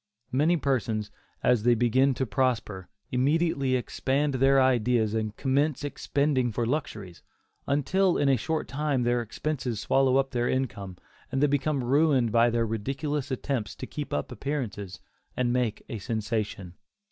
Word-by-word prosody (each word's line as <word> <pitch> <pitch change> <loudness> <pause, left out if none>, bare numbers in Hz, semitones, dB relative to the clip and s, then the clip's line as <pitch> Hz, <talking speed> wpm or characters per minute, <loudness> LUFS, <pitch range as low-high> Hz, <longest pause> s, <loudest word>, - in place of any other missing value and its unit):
Many 155 +7 +3
persons, 115 -7 -1 0.3
as 125 -3 +3
they 120 +2 +4
begin 130 +3 +3
to 130 - -1
prosper, 110 -5 -1 0.2
immediately 140 0 +1
expand 135 +3 -1
their 135 +1 +4
ideas 120 -4 +2
and 110 -1 -2
commence 140 +2 0
expending 140 -3 0
for 115 +2 -1
luxuries, 110 - -4 0.5
until 180 +7 +2
in 145 - +2
a 135 - +5
short 155 +7 -2
time 140 -3 -1
their 120 0 +1
expenses 125 0 -3
swallow 135 +2 +3
up 135 0 +1
their 120 -2 0
income, 100 -8 -3 0.3
and 135 - 0
they 145 - +4
become 145 -1 0
ruined 135 -3 +3
in 115 +1 +5
their 115 0 +1
ridiculous 135 +6 -3
attempts 125 -6 -3
to - - -6
keep 145 -1 -6
up - - -2
appearances, 115 -7 -4 0.4
and 120 -1 +1
make 125 -4 -1
a 115 -5 -5
"sensation." 105 -4 -3
130 Hz, 150 wpm, -27 LUFS, 115-140 Hz, 0.5 s, a